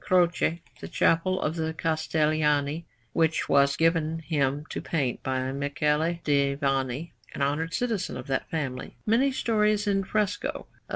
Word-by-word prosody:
Croce, 180 -3 +3
in 165 +1 +1 0.2
the - - -7
Chapel 185 +3 +2
of 155 - -1
the 160 0 -2
Castellani 155 -1 +1 0.3
(which 160 -1 +1
was 140 0 +4
given 165 -1 +2
him 145 -3 -1
to - - -3
paint 135 -7 -1
by 130 0 -1
Michele 150 +4 0
di 140 -1 +2
Vanni, 135 +2 -1 0.2
an - - -1
honoured 155 +4 -1
citizen 230 -6 -1
of - - -7
that 135 -2 -2
family), 135 -6 -4
many 245 +6 +3
stories 215 -4 +1
in 195 -1 +1
fresco 205 +1 -1
of - - -5
S. - - -16
160 Hz, 160 wpm, -27 LUFS, 140-170 Hz, 0.3 s, was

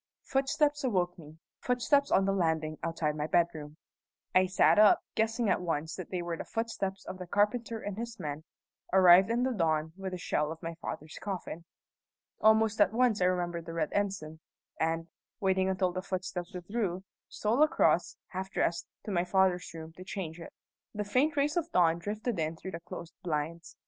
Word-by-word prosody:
Footsteps 290 +2 +1
awoke 180 -8 0
me 155 0 -13 0.2
footsteps 280 +3 +2
on 190 - +4
the 195 - +2
landing 160 -4 0
outside 165 -2 -1
my 150 0 -2
bedroom. 160 -3 0 0.6
I 185 0 +5
sat 185 +3 +4
up, 210 -1 +6
guessing 225 +1 0
at 190 - +2
once 160 -2 -2
that 185 - -7
they 180 -2 -3
were 170 -1 -3
the - - -5
footsteps 200 -4 -3
of 185 - -7
the 180 - -7
carpenter 225 +4 +1
and 205 -2 -5
his 235 -1 -6
men, 150 0 -4 0.5
arrived 185 +1 +7
in 235 +2 +1
the 260 0 +1
dawn 160 -5 0
with 190 0 -5
the - - -3
shell 150 -3 -1
of 165 +1 -9
my 165 0 -3
father's 155 +1 -6
coffin. 180 -4 -5 0.7
Almost 220 0 +4
at 200 0 +4
once 235 -4 +2
I - - +4
remembered 175 -2 -1
the 165 - -5
red 160 -2 -1
ensign, 195 -6 -2 0.4
and, 165 +1 0 0.3
waiting 190 -2 +2
until 185 -1 +1
the 185 +1 -3
footsteps 185 -2 -4
withdrew, 185 0 -2 0.3
stole 225 +6 0
across, 305 - +3
half 190 +1 -4
dressed, 170 -3 -1 0.2
to 210 - -5
my 175 -2 +2
father's 180 0 +2
room 160 0 -9
to 185 - -8
change 180 -4 -5
it. 165 - -9 0.4
The 210 - -1
faint 260 +9 +1
rays 290 +2 +2
of 335 -1 -1
dawn 170 -2 +3
drifted 210 +3 -3
in 160 +1 -1
through 190 +3 -7
the 165 - -5
closed 170 0 -9
blinds. 165 0 -3
185 Hz, 185 wpm, -30 LUFS, 165-210 Hz, 0.7 s, arrived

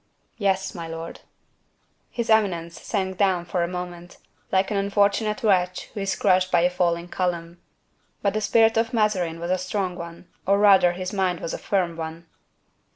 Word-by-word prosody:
"Yes, 195 -2 0
my 170 -2 -6
lord." 165 0 -7 0.9
His 235 -2 -2
eminence 175 -6 +1
sank 190 -3 -2
down 185 -3 +2
for 175 0 -1
a 170 - +1
moment, 180 -1 -7 0.3
like 190 +1 +2
an 205 - 0
unfortunate 200 +2 +1
wretch 185 -4 +1
who 215 - -5
is 195 -1 -1
crushed 185 -1 +2
by 175 - +4
a 180 +1 +3
falling 175 -1 0
column. 175 -1 -3 0.6
But 200 -1 +2
the 215 - -1
spirit 225 +2 +4
of 225 +1 +1
Mazarin 185 -7 +1
was 170 +1 -3
a 185 - +1
strong 185 0 -2
one, 170 0 -9 0.2
or 200 +1 +4
rather 190 -4 +6
his 185 +2 -5
mind 185 -3 0
was 165 - -4
a - - -4
firm 180 -4 -1
one. 165 +1 -6
185 Hz, 175 wpm, -24 LUFS, 175-200 Hz, 0.9 s, rather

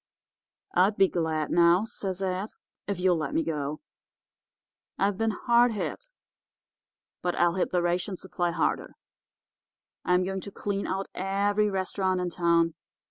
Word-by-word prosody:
"'I'd 200 +3 +3
be 195 - +6
glad, 160 -4 -1
now,' 175 +4 +5
says 195 -4 -4
Ed, 190 +2 -1 0.4
'if 200 -2 -2
you'll 180 -1 +3
let 155 -3 -3
me 165 - +2
go. 150 -2 -3 1.2
I've 195 +1 +1
been 225 +3 0
hard 235 +2 +3
hit, 485 - -4 1.1
but 175 -1 -1
I'll 175 0 +3
hit 185 - 0
the 180 -1 +1
ration 180 +2 -1
supply 175 -1 -2
harder. 170 - -1 1.1
I'm 180 0 +3
going 190 +1 -3
to 200 - -8
clean 200 0 -3
out 195 +1 -2
every 200 +2 +1
restaurant 190 -1 -1
in 180 -1 -2
town. 170 -1 +2
185 Hz, 140 wpm, -27 LUFS, 175-200 Hz, 1.2 s, be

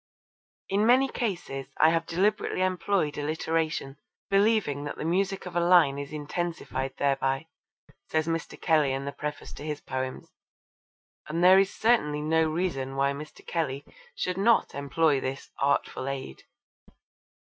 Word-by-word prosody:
'In 200 +2 +1
many 260 +3 +5
cases 175 - -3
I 160 - +6
have 165 0 0
deliberately 185 +2 +1
employed 185 -4 0
alliteration, 155 -1 -2 0.3
believing 195 -8 +2
that 145 - -5
the - - -4
music 190 +3 0
of 180 -1 -8
a - - +3
line 170 -5 +5
is 140 0 -6
intensified 150 -3 -4
thereby,' 135 +1 0 0.6
says 155 -1 +1
Mr. 165 0 -3
Kelly 155 -5 +3
in 135 +1 -3
the 140 - -3
preface 150 +1 -6
to - - -9
his 150 -1 -4
poems, 130 -1 -5 1.0
and 165 +3 -1
there 185 +1 +8
is 195 0 +2
certainly 150 -11 +1
no 160 +1 +2
reason 155 -6 -2
why 140 +1 +2
Mr. 150 +2 -10
Kelly 145 -4 -2 0.3
should 185 +1 -2
not 230 +3 +3
employ 140 +1 +1
this 135 +1 -5
'artful 140 -1 0
aid.' 135 - -6
155 Hz, 145 wpm, -27 LUFS, 140-180 Hz, 1.0 s, there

